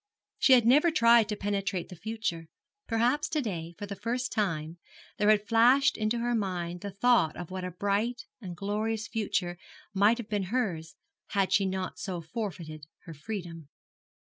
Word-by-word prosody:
She 265 Hz, -, +6 dB
had 245 Hz, -3 st, +6 dB
never 290 Hz, +8 st, +5 dB
tried 235 Hz, -7 st, +5 dB
to 210 Hz, -, -1 dB
penetrate 195 Hz, -3 st, -2 dB
the 180 Hz, -, -9 dB
future. 200 Hz, -4 st, -4 dB, 0.4 s
Perhaps 245 Hz, +6 st, +1 dB
to 315 Hz, -1 st, 0 dB
day 170 Hz, -, -4 dB
for 205 Hz, -, -5 dB
the 200 Hz, 0 st, -6 dB
first 245 Hz, +4 st, -2 dB
time 165 Hz, -6 st, -2 dB, 0.4 s
there 210 Hz, 0 st, +3 dB
had 210 Hz, -1 st, +3 dB
flashed 245 Hz, +4 st, +5 dB
into 215 Hz, +2 st, 0 dB
her 240 Hz, +1 st, 0 dB
mind 180 Hz, -5 st, -2 dB
the 200 Hz, -, -4 dB
thought 200 Hz, -4 st, +2 dB
of 175 Hz, 0 st, -7 dB
what 185 Hz, -1 st, -4 dB
a 180 Hz, -, -3 dB
bright 205 Hz, +6 st, -1 dB, 0.2 s
and 180 Hz, -5 st, -7 dB
glorious 215 Hz, +3 st, -2 dB
future 180 Hz, -5 st, -2 dB, 0.3 s
might 205 Hz, +4 st, +4 dB
have 235 Hz, -4 st, -6 dB
been 205 Hz, -3 st, -1 dB
hers 180 Hz, -8 st, -2 dB, 0.3 s
had 195 Hz, -2 st, 0 dB
she 195 Hz, -1 st, +3 dB
not 190 Hz, 0 st, -4 dB
so 185 Hz, -4 st, -4 dB
forfeited 165 Hz, -4 st, -6 dB, 0.2 s
her 165 Hz, -, -9 dB
freedom. 165 Hz, -2 st, -7 dB
205 Hz, 170 wpm, -29 LUFS, 175-230 Hz, 0.4 s, She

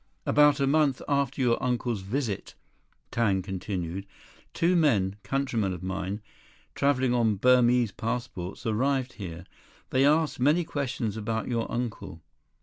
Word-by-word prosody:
"About 150 Hz, -1 st, +5 dB
a 140 Hz, -, +2 dB
month 140 Hz, -1 st, +2 dB
after 140 Hz, -1 st, 0 dB
your 120 Hz, -2 st, +2 dB
uncle's 120 Hz, -4 st, -1 dB
visit," 105 Hz, +1 st, -3 dB, 0.6 s
Tang 100 Hz, -5 st, +1 dB
continued, 95 Hz, -1 st, -4 dB, 0.4 s
"two 175 Hz, +2 st, +2 dB
men, 105 Hz, -, +2 dB
countrymen 120 Hz, -8 st, -1 dB
of 90 Hz, 0 st, -8 dB
mine, 95 Hz, +2 st, -3 dB, 0.5 s
traveling 130 Hz, -3 st, +2 dB
on 115 Hz, -3 st, +2 dB
Burmese 125 Hz, 0 st, +4 dB
passports, 115 Hz, -3 st, -4 dB
arrived 130 Hz, +3 st, 0 dB
here. 85 Hz, -4 st, -7 dB, 0.5 s
They 130 Hz, +1 st, +3 dB
asked 155 Hz, +1 st, +3 dB
many 150 Hz, +7 st, +3 dB
questions 130 Hz, -8 st, -3 dB
about 110 Hz, +1 st, -2 dB
your 115 Hz, -2 st, -1 dB
uncle." 120 Hz, -9 st, -4 dB
120 Hz, 130 wpm, -27 LUFS, 100-135 Hz, 0.6 s, About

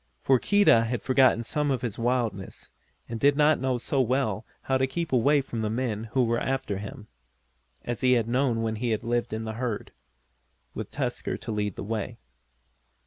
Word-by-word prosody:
For 130 Hz, -2 st, +4 dB
Keedah 200 Hz, -, +4 dB
had 115 Hz, -1 st, -3 dB
forgotten 130 Hz, -3 st, +4 dB
some 150 Hz, +5 st, -1 dB
of 130 Hz, -3 st, -1 dB
his 115 Hz, -3 st, -3 dB
wildness, 115 Hz, -5 st, -2 dB, 0.4 s
and 115 Hz, -1 st, -5 dB
did 140 Hz, +2 st, +4 dB
not 150 Hz, +1 st, +4 dB
know 130 Hz, -1 st, +1 dB
so 135 Hz, +3 st, 0 dB
well 120 Hz, -4 st, 0 dB, 0.2 s
how 130 Hz, -1 st, +1 dB
to 130 Hz, -, +2 dB
keep 165 Hz, +3 st, -3 dB
away 140 Hz, +4 st, +4 dB
from 120 Hz, -4 st, -5 dB
the 110 Hz, -, -1 dB
men 115 Hz, -2 st, -2 dB
who 130 Hz, -2 st, +3 dB
were 115 Hz, 0 st, +1 dB
after 130 Hz, -7 st, -2 dB
him, 105 Hz, +2 st, -8 dB, 0.8 s
as 120 Hz, -1 st, -3 dB
he 130 Hz, -1 st, +4 dB
had 115 Hz, -3 st, +2 dB
known 120 Hz, -2 st, +1 dB
when 110 Hz, -1 st, -1 dB
he 115 Hz, -1 st, 0 dB
lived 120 Hz, +2 st, -2 dB
in 110 Hz, +1 st, -3 dB
the 110 Hz, 0 st, -4 dB
herd, 120 Hz, -5 st, -3 dB, 0.8 s
with -, -, -5 dB
Tusker -, -, -3 dB
to -, -, -6 dB
lead 105 Hz, -2 st, -2 dB
the -, -, -6 dB
way. 110 Hz, +2 st, -4 dB
120 Hz, 190 wpm, -27 LUFS, 110-130 Hz, 0.8 s, For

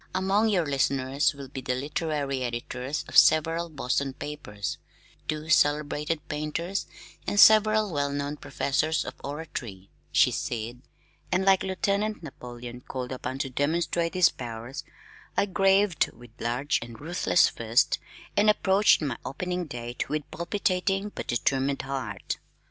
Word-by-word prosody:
"Among 195 Hz, +4 st, +2 dB
your 180 Hz, -6 st, +2 dB
listeners 140 Hz, +1 st, +1 dB
will 140 Hz, -1 st, -8 dB
be 130 Hz, 0 st, -7 dB
the 125 Hz, 0 st, -1 dB
literary 145 Hz, -1 st, -2 dB
editors 125 Hz, +3 st, -3 dB
of -, -, -9 dB
several 165 Hz, +2 st, +5 dB
Boston 135 Hz, -2 st, -1 dB
papers, 135 Hz, -9 st, -5 dB, 0.5 s
two 155 Hz, 0 st, -3 dB
celebrated 150 Hz, 0 st, +2 dB
painters, 155 Hz, +5 st, -3 dB, 0.4 s
and 205 Hz, -, +1 dB
several 215 Hz, -2 st, +6 dB
well 140 Hz, -1 st, 0 dB
known 145 Hz, +1 st, -3 dB
professors 145 Hz, +3 st, 0 dB
of -, -, -5 dB
oratory," 140 Hz, -10 st, -6 dB, 0.2 s
she -, -, +5 dB
said, 120 Hz, +1 st, -4 dB, 0.5 s
and 185 Hz, +1 st, +2 dB
like 195 Hz, -1 st, +5 dB
Lieutenant 200 Hz, +2 st, -1 dB
Napoleon 125 Hz, -4 st, -8 dB
called 125 Hz, 0 st, -5 dB
upon 130 Hz, 0 st, -4 dB
to 135 Hz, -1 st, -3 dB
demonstrate 165 Hz, +5 st, 0 dB
his 180 Hz, -2 st, +6 dB
powers, 120 Hz, +4 st, -7 dB, 0.5 s
I -, -, +4 dB
graved 195 Hz, -1 st, +3 dB
with 120 Hz, -1 st, -15 dB
large 125 Hz, +5 st, 0 dB
and 115 Hz, -1 st, -9 dB
ruthless 175 Hz, +3 st, +3 dB
fist, 115 Hz, +1 st, +1 dB, 0.4 s
and 210 Hz, +1 st, +5 dB
approached 200 Hz, -3 st, +4 dB
my 135 Hz, -6 st, -2 dB
opening 180 Hz, +5 st, -3 dB
date 120 Hz, -2 st, -5 dB
with 150 Hz, +1 st, -1 dB
palpitating 195 Hz, +3 st, 0 dB
but -, -, -6 dB
determined 135 Hz, +3 st, 0 dB
heart. 130 Hz, -8 st, -4 dB
145 Hz, 135 wpm, -27 LUFS, 130-180 Hz, 0.5 s, several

